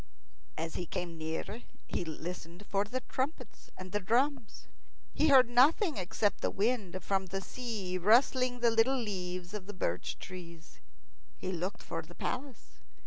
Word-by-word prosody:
As 165 0 -3
he 175 - -3
came 170 -1 -4
near, 160 +8 -3 0.2
he - - -2
listened 170 +3 -6
for 200 0 +1
the 255 +5 -3
trumpets 260 -4 -4
and 185 0 -8
the 205 - +1
drums. 240 +4 0 0.5
He 310 - +3
heard 265 -4 +8
nothing 285 - +4
except 200 +2 0
the - - +2
wind 200 -4 0
from 190 0 0
the 195 +2 -2
sea 200 -4 -4
rustling 245 +4 +4
the 235 -1 +5
little 225 +4 +4
leaves 185 -5 -3
of 200 -3 -5
birch 90 - -1
trees. 170 -3 -10 0.6
He 185 - -3
looked 185 +2 -3
for - - -3
the - - -14
palace. 260 -1 -5
200 Hz, 150 wpm, -32 LUFS, 180-245 Hz, 0.6 s, heard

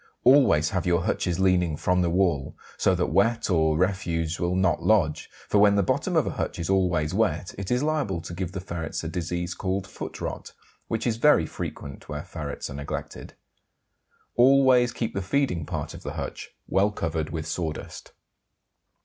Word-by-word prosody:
Always 125 - +5
have 90 -1 -1
your 85 -1 +2
hutches 90 -2 -1
leaning 90 -4 +2
from 90 +3 +1
the 85 - +1
wall, 85 -6 0 0.2
so - - +2
that - - -1
wet 115 -2 +2
or 80 -3 +3
refuse 85 -3 -1
will 85 +1 0
not 95 -3 +2
lodge, 95 -9 +2 0.2
for 105 - +3
when 100 0 +6
the 100 - +3
bottom - - 0
of - - +3
a - - -2
hutch - - -3
is 85 +3 -2
always 90 -5 +1
wet 95 -5 0
it 100 -1 -5
is 125 +3 +1
liable 150 - 0
to 85 - -8
give 90 0 -4
the 95 - -3
ferrets 85 -4 -5
a - - -3
disease 90 +1 -3
called 95 +1 -2
foot 95 - -8
rot, - - -5 0.3
which 115 - -2
is 115 -2 0
very 120 - +5
frequent 70 -2 -7
where 75 -1 -4
ferrets 75 -4 -6
are - - -8
neglected. 70 +1 -6 1.0
Always 130 -1 +5
keep 115 -1 -3
the 100 - -2
feeding 95 - 0
part - - -4
of - - -10
the - - -6
hutch - - -6 0.2
well 95 +2 +3
covered 80 -6 -3
with 80 -1 -4
sawdust. 80 -1 -5
90 Hz, 185 wpm, -26 LUFS, 80-100 Hz, 1.0 s, when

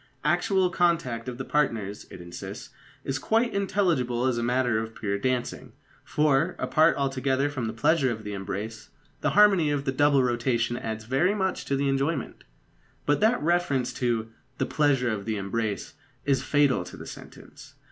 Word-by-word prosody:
"Actual 190 -4 +2
contact 165 -10 0
of 120 - -7
the 135 - -5
partners," 110 -9 -1
it - - -10
insists, 85 0 -8 0.3
"is 135 0 -2
quite 225 - +1
intelligible 170 -12 +1
as 125 -2 +1
matter 120 -1 +1
of 110 0 -6
pure 100 -2 -2
dancing; 125 +2 -2 0.3
for, 150 +3 +1
apart 155 0 +3
altogether 135 0 0
from 130 -5 -3
the - - -2
pleasure 135 +4 +2
of 110 -2 -5
the 105 -1 -5
embrace, 105 +3 -5 0.3
the - - +1
harmony 195 -7 +6
of 145 -1 -1
the 135 - +1
double 140 0 +3
rotation 120 -1 0
adds 110 -2 -4
very 155 - +2
much 190 -2 -1
to 140 - 0
the 140 +1 0
enjoyment." 135 +4 -1 0.6
But 145 - +2
that 220 0 +2
reference 165 -7 +1
to 115 -3 -1 0.3
"the - - 0
pleasure 135 -5 +2
of 100 -2 -4
the 110 -2 -2
embrace" 100 +1 -3 0.3
is 140 -2 +2
fatal 145 -9 +2
to - - -10
the - - -9
sentence. - - -12
130 Hz, 165 wpm, -26 LUFS, 115-150 Hz, 0.6 s, harmony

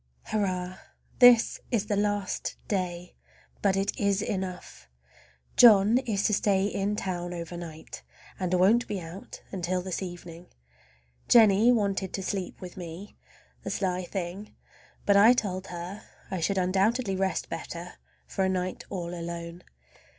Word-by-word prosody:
Hurrah! 185 -3 -2 0.4
This 245 -2 +6
is 225 -5 0
the 210 - -1
last 205 -1 -1
day, 180 -3 -3 0.5
but 195 -1 +2
it 195 +1 0
is 200 0 +1
enough. 185 - -5 0.7
John 220 0 +7
is 220 -6 -1
to 215 - +2
stay 195 -1 +2
in 200 0 -1
town 175 -3 -3
over 170 0 -6
night, 165 -2 -8 0.4
and 185 -2 -2
won't 210 +7 +4
be 200 - -3
out 170 +3 -10
until 180 -1 -2
this 185 0 -3
evening. 175 -1 -8 0.8
Jennie 220 0 +6
wanted 200 -5 0
to 195 - -3
sleep 190 -2 -4
with 180 0 -9
me—the 175 +3 -11
sly 185 -2 -1
thing! 185 +3 -6 0.5
but 200 -1 +5
I 220 +5 +8
told 190 -5 -2
her 180 +4 -7 0.3
I 190 - -2
should 195 +4 0
undoubtedly 195 +4 +1
rest 190 -2 -1
better 170 +1 -6 0.3
for 190 - -2
a 190 - +2
night 185 0 -2
all 175 -3 -4
alone. 170 0 -6
190 Hz, 140 wpm, -28 LUFS, 180-205 Hz, 0.8 s, I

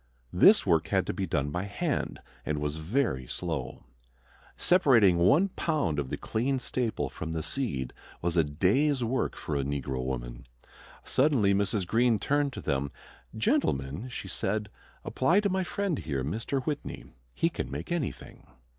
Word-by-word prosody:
This - - +6
work - - +3
had - - +1
to - - -2
be - - -2
done 75 -1 0
by 90 +5 -2
hand 140 - -2 0.2
and 75 - -2
was 75 +1 -2
very 80 - -1
slow. 80 -7 -4 0.7
Separating 115 - +5
one 145 - +5
pound 150 - -1
of 70 -2 -3
the - - -3
clean 130 +5 -1
staple 125 -2 -1
from 80 0 -6
the 80 -1 -2
seed 70 - -2 0.3
was 85 0 -1
a 85 - +5
day's 115 - +2
work 125 +3 -1
for 75 - -4
a 70 - +1
negro 70 -2 -2
woman. - - -5 0.6
Suddenly 130 -8 +3
Mrs. 100 0 +1
Greene 115 +4 +3
turned 145 +5 +1
to - - -6
them. 70 0 -1 0.5
"Gentlemen," 70 - 0
she 120 - -6
said, 100 +2 -2 0.4
"apply 165 +10 +3
to 205 - +1
my 190 0 0
friend 190 -3 -2
here, 70 -4 -2
Mr. 115 - -2
Whitney. 145 - -4 0.3
He 165 - +2
can - - -4
make - - -6
anything." 170 -8 -4
100 Hz, 160 wpm, -29 LUFS, -, 0.7 s, This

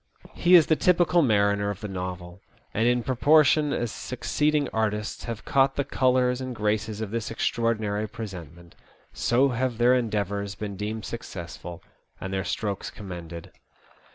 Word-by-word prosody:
He 180 +1 +5
is 165 -3 +8
the 160 - +3
typical 175 0 +3
mariner 100 -5 +2
of 100 -1 -5
the 105 - -4
novel, 90 -1 -6 0.3
and 115 +2 +2
in 120 0 +2
proportion 150 +3 +4
as 120 -5 -1
succeeding 150 +3 -1
artists 105 -1 -2
have 115 -2 -6
caught 135 0 +3
the 140 - 0
colours 125 -1 +1
and 130 -1 -5
graces 105 0 -1
of 105 -2 -4
this 115 -1 -3
extraordinary 110 -2 -1
presentment, 85 - -9 0.4
so 130 +4 +2
have 125 -1 -1
their 120 +2 +5
endeavours 100 -4 -1
been 105 -2 -5
deemed 105 +2 -4
successful, 85 -6 -7 0.4
and 95 0 -5
their 95 0 -1
strokes 100 -1 -3
commended. 85 -4 -9
110 Hz, 150 wpm, -26 LUFS, 100-125 Hz, 0.4 s, is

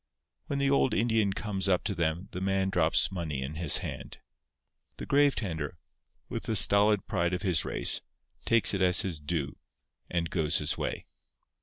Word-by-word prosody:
When 140 - -2
the 140 0 +1
old 140 -1 +2
Indian 110 -3 +1
comes 95 -1 -3
up 90 -2 +2
to 100 - -1
them 85 +1 -2
the 90 - -6
man 95 0 0
drops 85 -2 +2
money 80 -7 -4
in 70 +3 -6
his 80 -2 +3
hand. - - -7 0.8
The - - -6
grave 145 0 +3
tender, 80 - -4 0.5
with - - -5
the - - -1
stolid 105 0 +4
pride 85 -2 -1
of 90 - -6
his 90 -6 +2
race, - - -1 0.4
takes 115 -2 +4
it 100 - -2
as 90 -1 +5
his 85 -5 -4
due, 75 -2 -4 0.5
and 85 -2 -2
goes 80 -1 +2
his 75 - 0
way. - - -4
90 Hz, 175 wpm, -29 LUFS, 80-100 Hz, 0.8 s, as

